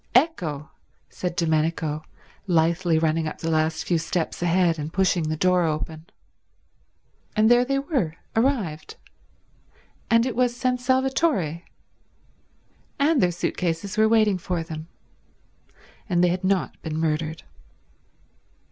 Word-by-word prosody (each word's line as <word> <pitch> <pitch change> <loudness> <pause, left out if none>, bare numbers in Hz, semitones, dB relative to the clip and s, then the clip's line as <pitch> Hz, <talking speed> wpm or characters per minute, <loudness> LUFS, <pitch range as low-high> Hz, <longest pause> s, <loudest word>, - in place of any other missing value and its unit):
"Ecco," 175 - +1 0.4
said 180 -1 -4
Domenico, 160 -2 0 0.4
lithely 170 0 +2
running 160 0 +1
up - - -5
the 165 - -3
last 155 0 0
few 170 -2 +1
steps 165 +1 -2
ahead 175 -1 +2
and 150 +1 -4
pushing 175 -3 +1
the 155 - -2
door 180 +2 +3
open. 155 0 -3 1.3
And 220 +1 +4
there 240 0 +6
they 275 +2 0
were, 270 - -1 0.2
arrived; 220 - 0 1.1
and 230 +1 +4
it 255 - -2
was 245 0 +1
San 250 0 0
Salvatore; 260 - +1 1.4
and 295 -1 +3
their 180 - +3
suit 175 - -3
cases 175 +4 -2
were 220 0 +4
waiting 215 -4 +3
for 175 -1 -2
them; 160 -1 -7 1.2
and 175 -1 +2
they 180 - +5
had 180 +2 -2
not 190 -1 0
been 155 -1 -4
murdered. 160 0 -1
175 Hz, 130 wpm, -24 LUFS, 160-230 Hz, 1.4 s, there